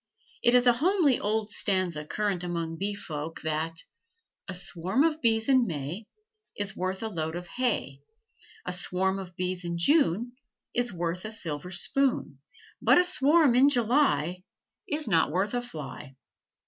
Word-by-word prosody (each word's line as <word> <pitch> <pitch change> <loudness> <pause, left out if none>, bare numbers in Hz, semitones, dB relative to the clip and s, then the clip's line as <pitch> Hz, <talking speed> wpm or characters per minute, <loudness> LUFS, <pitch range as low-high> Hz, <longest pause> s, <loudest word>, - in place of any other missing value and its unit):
It 240 +1 +4
is 250 0 +5
a 245 - +6
homely 310 0 +2
old 215 +1 -1
stanza 185 -7 0
current 195 +2 -2
among 170 -2 -3
bee 200 +1 -2
folk 160 -4 -6
that 160 +1 -2 0.6
"A 190 - -5
swarm 180 - -1
of 320 -1 +1
bees 225 -2 +2
in 260 -3 +4
May 165 +6 -5 0.5
Is 205 -1 -3
worth 185 +3 -3
a - - -1
load 160 -5 -3
of 175 0 -5
hay; 225 - -2 0.6
A 180 - -2
swarm 190 +1 0
of 180 -2 -9
bees 180 0 -2
in 170 0 -3
June 240 - +3 0.4
Is 245 0 0
worth 175 0 -3
a 215 - -4
silver 175 -6 -3
spoon; 185 - 0 0.4
But - - +5
a 355 - +6
swarm 300 -3 +4
in 260 +4 +6
July 235 - +2 0.5
Is 305 -3 -2
not 165 -6 +3
worth 190 +7 -1
a 245 - 0
fly." 150 - -9
190 Hz, 160 wpm, -28 LUFS, 170-245 Hz, 0.6 s, a